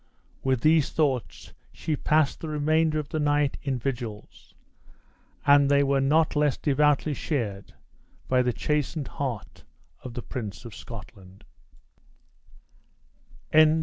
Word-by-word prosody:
With 130 Hz, -3 st, +1 dB
these 155 Hz, 0 st, +4 dB
thoughts, 135 Hz, -8 st, -2 dB, 0.2 s
she 155 Hz, -, -3 dB
passed 150 Hz, 0 st, +1 dB
the 160 Hz, -, -6 dB
remainder 155 Hz, +1 st, +1 dB
of 150 Hz, -2 st, -3 dB
the 155 Hz, -, -2 dB
night 145 Hz, -1 st, +1 dB
in 135 Hz, -2 st, -2 dB
vigils; 120 Hz, -4 st, -6 dB, 0.9 s
and 140 Hz, 0 st, +6 dB
they 140 Hz, 0 st, +4 dB
were 140 Hz, 0 st, +2 dB
not 155 Hz, +4 st, +2 dB
less 150 Hz, -3 st, +2 dB
devoutly 150 Hz, +1 st, +2 dB
shared 110 Hz, -10 st, -3 dB, 0.5 s
by 130 Hz, -1 st, +3 dB
the 125 Hz, 0 st, +1 dB
chastened 150 Hz, +2 st, -2 dB
heart 120 Hz, -10 st, -5 dB, 0.4 s
of 125 Hz, -2 st, -8 dB
the 120 Hz, -, -5 dB
Prince 110 Hz, -2 st, -6 dB
of 115 Hz, -, -8 dB
Scotland. 100 Hz, -4 st, -11 dB
140 Hz, 120 wpm, -26 LUFS, 120-150 Hz, 0.9 s, and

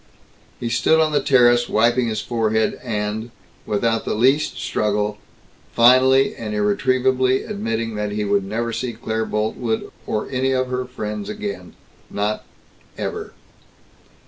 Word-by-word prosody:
He 120 Hz, -, -3 dB
stood 160 Hz, +7 st, +3 dB
on 155 Hz, -1 st, +3 dB
the 145 Hz, -, +2 dB
terrace 120 Hz, -3 st, +4 dB
wiping 120 Hz, +2 st, +3 dB
his 110 Hz, -2 st, -2 dB
forehead 110 Hz, -2 st, 0 dB
and, 110 Hz, -1 st, -3 dB, 0.4 s
without 115 Hz, +2 st, 0 dB
the -, -, -2 dB
least 135 Hz, +7 st, +2 dB
struggle, 105 Hz, 0 st, -1 dB, 0.6 s
finally 130 Hz, +3 st, +5 dB
and 105 Hz, -2 st, -5 dB
irretrievably 130 Hz, +5 st, +2 dB
admitting 115 Hz, -, -3 dB
that 105 Hz, -1 st, -3 dB
he 105 Hz, 0 st, -2 dB
would 100 Hz, -1 st, +1 dB
never 115 Hz, +4 st, -3 dB
see 120 Hz, +1 st, -3 dB
Claire 110 Hz, 0 st, -3 dB
Boltwood 110 Hz, +2 st, -2 dB, 0.2 s
or 110 Hz, -, -2 dB
any 130 Hz, 0 st, +1 dB
of 130 Hz, -1 st, 0 dB
her 125 Hz, 0 st, -2 dB
friends 105 Hz, -5 st, -5 dB
again. 100 Hz, -4 st, -6 dB, 0.3 s
Not 105 Hz, +1 st, -2 dB, 0.5 s
never! -, -, -5 dB
115 Hz, 135 wpm, -21 LUFS, 105-130 Hz, 0.6 s, finally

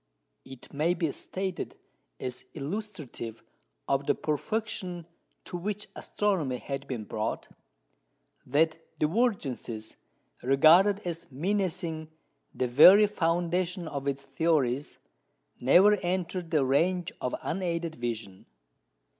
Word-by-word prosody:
It 130 Hz, -2 st, -12 dB
may 160 Hz, +5 st, +1 dB
be 165 Hz, -4 st, 0 dB
stated 190 Hz, +4 st, -4 dB, 0.4 s
as 125 Hz, 0 st, -5 dB
illustrative 150 Hz, -, -5 dB, 0.4 s
of 140 Hz, 0 st, 0 dB
the -, -, +3 dB
perfection 180 Hz, +1 st, -3 dB, 0.4 s
to 175 Hz, -, -5 dB
which 210 Hz, +3 st, -4 dB
astronomy 175 Hz, -11 st, -1 dB
had 135 Hz, +2 st, -5 dB
been 125 Hz, -5 st, -4 dB
brought, 110 Hz, +1 st, -3 dB, 1.0 s
that 160 Hz, +5 st, +2 dB, 0.2 s
divergencies 150 Hz, -, -1 dB, 0.4 s
regarded 165 Hz, +10 st, +5 dB
as 170 Hz, -4 st, -5 dB
menacing 165 Hz, 0 st, -2 dB, 0.4 s
the 125 Hz, -, -1 dB
very 180 Hz, -, +8 dB
foundation 175 Hz, -1 st, 0 dB
of 140 Hz, -2 st, -4 dB
its 140 Hz, 0 st, -2 dB
theories 140 Hz, -2 st, 0 dB, 0.6 s
never 180 Hz, +11 st, +6 dB
entered 180 Hz, -1 st, -2 dB
the 150 Hz, -4 st, +2 dB
range 170 Hz, +6 st, +1 dB
of 125 Hz, -, -1 dB
unaided 170 Hz, -2 st, -2 dB
vision. 115 Hz, -7 st, -5 dB
160 Hz, 105 wpm, -29 LUFS, 135-185 Hz, 1.0 s, very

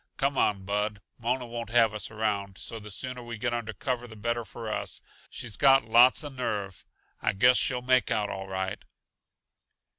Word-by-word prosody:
Come 140 Hz, 0 st, +1 dB
on, 100 Hz, -6 st, +1 dB
Bud. 105 Hz, +1 st, -1 dB, 0.2 s
Mona 125 Hz, +2 st, -1 dB
won't 115 Hz, -1 st, -6 dB
have 115 Hz, -2 st, +4 dB
us 105 Hz, -, -4 dB
around, 100 Hz, -3 st, -2 dB
so 115 Hz, -, -4 dB
the 105 Hz, 0 st, -10 dB
sooner 125 Hz, +5 st, -5 dB
we 120 Hz, -1 st, -7 dB
get 120 Hz, +2 st, -1 dB
under 115 Hz, -2 st, -3 dB
cover 125 Hz, -2 st, -3 dB
the 110 Hz, -, -11 dB
better 115 Hz, +2 st, -2 dB
for 115 Hz, 0 st, -8 dB
us. 110 Hz, -, -3 dB, 0.3 s
She's 110 Hz, -5 st, -5 dB
got 135 Hz, -3 st, +6 dB
lots 120 Hz, +6 st, +6 dB
uh 145 Hz, -, -5 dB
nerve; 105 Hz, -8 st, -4 dB, 0.4 s
I -, -, +1 dB
guess 125 Hz, +6 st, +5 dB
she'll 125 Hz, -2 st, +1 dB
make 130 Hz, -2 st, +3 dB
out 105 Hz, -1 st, +1 dB
all 95 Hz, 0 st, -5 dB
right." 95 Hz, 0 st, -3 dB
115 Hz, 185 wpm, -28 LUFS, 105-125 Hz, 0.4 s, got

